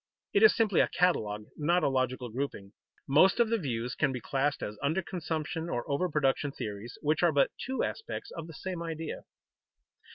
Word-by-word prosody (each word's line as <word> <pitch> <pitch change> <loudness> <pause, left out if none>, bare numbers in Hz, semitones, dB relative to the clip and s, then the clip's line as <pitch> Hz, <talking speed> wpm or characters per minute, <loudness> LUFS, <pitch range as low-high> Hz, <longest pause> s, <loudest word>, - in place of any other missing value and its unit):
It 405 - +4
is 435 - +8
simply 220 -6 +3
a - - +3
catalogue, 105 -13 +1
not 170 +3 +2
a - - +4
logical 130 -2 0
grouping. 110 -5 -4 0.3
Most 160 - +5
of 235 -2 +4
the 230 0 +1
views 120 - -2
can - - +1
be 130 - -3
classed 135 +3 -1
as 105 0 -5
under 160 +7 +1
consumption 160 -1 -3
or 120 -5 -2
over 160 +6 0
production 145 -1 +1
theories, 105 -2 -6
which 155 +1 +2
are 175 -2 +5
but 140 -2 +3
two 265 +1 -1
aspects 445 - -4
of 165 -1 -7
the 165 - -10
same 180 +2 -5
idea. 165 -2 -5
150 Hz, 190 wpm, -30 LUFS, 130-175 Hz, 0.3 s, is